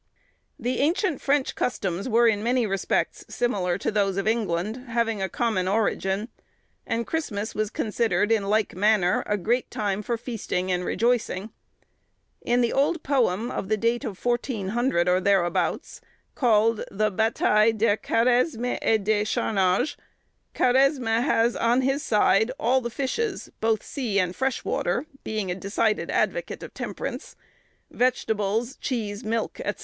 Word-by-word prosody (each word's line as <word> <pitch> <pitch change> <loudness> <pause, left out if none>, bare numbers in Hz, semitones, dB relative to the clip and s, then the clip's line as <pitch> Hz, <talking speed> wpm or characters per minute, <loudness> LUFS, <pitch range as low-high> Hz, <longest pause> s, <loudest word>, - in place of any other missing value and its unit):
The 250 +2 -2
ancient 330 +2 +1
French 280 -1 +1
customs 195 -3 -2
were 235 +1 +4
in 210 -2 +2
many 240 +1 +1
respects 195 -2 -1
similar 185 -7 0
to 200 - -2
those 200 -2 +1
of 200 +1 -1
England, 220 +2 -1
having 230 -3 0
a 190 - -1
common 215 -3 0
origin; 200 0 0 0.6
and 230 0 -1
Christmas 220 -10 -3
was 215 -1 -1
considered, 220 -1 0
in 215 -3 +2
like 215 -2 +1
manner, 200 -2 +3
a 210 - +1
great 235 +7 0
time 205 -1 -2
for 235 +3 -2
feasting 215 -6 -3
and 180 0 0
rejoicing. 225 -1 0 0.9
In 245 +1 +1
the 235 - +1
old 285 +5 +1
poem, 240 -5 +1
of 190 - -4
the 215 - +2
date 230 +2 0
of 200 -4 -5
1400, 240 -5 0
or 180 +1 +3
thereabouts, 185 -3 0 0.3
called 225 -3 +2
the 215 +2 0
"Bataille 220 +1 +3
de 220 -1 +2
Karesme 245 +2 +1
et 220 -2 +2
de 210 0 +2
charnage," 195 +2 +1 0.6
Karesme 255 -3 +3
has 235 -3 +2
on 240 +2 +2
his 270 +2 0
side 220 -3 +3
all 260 -1 +2
the 235 - -3
fishes, 280 - -3
both 220 -1 +1
sea 240 -8 -3
and 180 -2 +1
fresh 265 -1 -1
water—being 215 - -2
a - - -2
decided 205 +3 -1
advocate - - -1
of - - -9
temperance—vegetables, 225 -1 -3
cheese, 215 -5 -3
milk, 225 +1 -2
&c. - - -2
225 Hz, 145 wpm, -25 LUFS, 200-245 Hz, 0.9 s, were